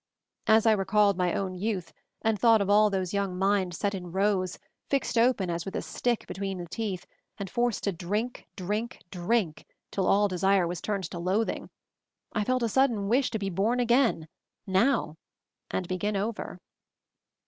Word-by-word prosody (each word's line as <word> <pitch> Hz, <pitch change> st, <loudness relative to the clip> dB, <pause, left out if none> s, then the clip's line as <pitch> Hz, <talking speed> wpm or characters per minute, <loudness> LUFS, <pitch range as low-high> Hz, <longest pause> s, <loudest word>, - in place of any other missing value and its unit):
As 220 Hz, +1 st, +5 dB
I 225 Hz, -, +6 dB
re 205 Hz, -3 st, +2 dB
called 205 Hz, -1 st, +4 dB
my 180 Hz, -1 st, 0 dB
own 190 Hz, -2 st, -2 dB
youth, 185 Hz, -3 st, -3 dB, 0.3 s
and 220 Hz, -2 st, +1 dB
thought 225 Hz, +1 st, +6 dB
of 200 Hz, 0 st, +1 dB
all 210 Hz, +1 st, +6 dB
those 190 Hz, -2 st, -2 dB
young 200 Hz, -2 st, -1 dB
minds 190 Hz, -2 st, +1 dB
set 205 Hz, -1 st, 0 dB
in 180 Hz, -3 st, -6 dB
rows, 190 Hz, -1 st, +1 dB, 0.3 s
fixed 275 Hz, -2 st, 0 dB
open 230 Hz, -6 st, +3 dB
as 170 Hz, 0 st, -2 dB
with 195 Hz, +2 st, -6 dB
a -, -, -1 dB
stick 240 Hz, -2 st, -1 dB
between 195 Hz, -1 st, -4 dB
the 175 Hz, -, -5 dB
teeth, 190 Hz, 0 st, -4 dB, 0.3 s
and 200 Hz, -, -4 dB
forced 240 Hz, +3 st, 0 dB
to 200 Hz, -, +1 dB
drink, 205 Hz, +8 st, -3 dB
drink, 210 Hz, +6 st, -3 dB
drink 180 Hz, -2 st, 0 dB, 0.3 s
till 195 Hz, -, 0 dB
all 205 Hz, +1 st, +4 dB
desire 190 Hz, 0 st, +2 dB
was 175 Hz, 0 st, -4 dB
turned 200 Hz, -2 st, -2 dB
to 175 Hz, -, -5 dB
loathing, 190 Hz, +6 st, -1 dB, 0.6 s
I 210 Hz, -, +1 dB
felt 255 Hz, +2 st, +1 dB
a -, -, +2 dB
sudden 225 Hz, -4 st, +2 dB
wish 250 Hz, +3 st, +3 dB
to 225 Hz, -, -2 dB
be 195 Hz, -2 st, -3 dB
born 215 Hz, +7 st, +1 dB
again 240 Hz, -, +2 dB, 0.2 s
— -, -, -61 dB
now! 190 Hz, -, +2 dB, 0.3 s
— -, -, -59 dB
and 185 Hz, -, -2 dB
begin 200 Hz, +3 st, -1 dB
over. 210 Hz, +3 st, -3 dB
200 Hz, 185 wpm, -28 LUFS, 185-225 Hz, 0.6 s, I